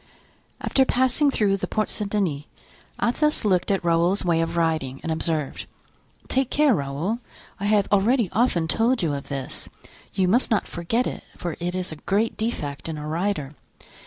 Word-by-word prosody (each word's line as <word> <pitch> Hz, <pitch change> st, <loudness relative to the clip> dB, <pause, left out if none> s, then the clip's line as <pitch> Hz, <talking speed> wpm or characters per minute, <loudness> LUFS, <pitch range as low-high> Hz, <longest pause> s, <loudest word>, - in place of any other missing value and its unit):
After 270 Hz, -, +3 dB
passing 260 Hz, +3 st, +2 dB
through 205 Hz, -7 st, +2 dB
the -, -, -3 dB
Porte 215 Hz, -1 st, 0 dB
Saint 210 Hz, -2 st, -2 dB
Denis, 175 Hz, -9 st, -1 dB, 0.5 s
Athos 300 Hz, +3 st, +1 dB
looked 185 Hz, -4 st, +2 dB
at 195 Hz, -3 st, 0 dB
Raoul's 170 Hz, +3 st, +2 dB
way 165 Hz, -2 st, +3 dB
of 165 Hz, +1 st, -2 dB
riding 155 Hz, -6 st, 0 dB
and 165 Hz, -, -2 dB
observed: 160 Hz, -3 st, -2 dB, 0.6 s
"Take 265 Hz, -1 st, +1 dB
care, 295 Hz, -3 st, +4 dB
Raoul! 155 Hz, +8 st, -1 dB, 0.4 s
I 200 Hz, -, -3 dB
have 205 Hz, -2 st, +3 dB
already 215 Hz, +3 st, +3 dB
often 195 Hz, -7 st, +2 dB
told 230 Hz, +5 st, +2 dB
you 155 Hz, -3 st, +1 dB
of 140 Hz, -1 st, -5 dB
this; 135 Hz, -2 st, -4 dB, 0.4 s
you 185 Hz, -1 st, +1 dB
must 235 Hz, +8 st, +3 dB
not 215 Hz, -5 st, +1 dB
forget 225 Hz, +9 st, -1 dB
it, -, -, -4 dB
for 175 Hz, -3 st, -4 dB
it 175 Hz, +1 st, -2 dB
is 185 Hz, -2 st, -2 dB
a 155 Hz, -, -7 dB
great 205 Hz, +8 st, 0 dB
defect 160 Hz, -11 st, -3 dB
in 160 Hz, -, -4 dB
a 150 Hz, -, -6 dB
rider. 160 Hz, -3 st, -1 dB
185 Hz, 175 wpm, -24 LUFS, 160-225 Hz, 0.6 s, care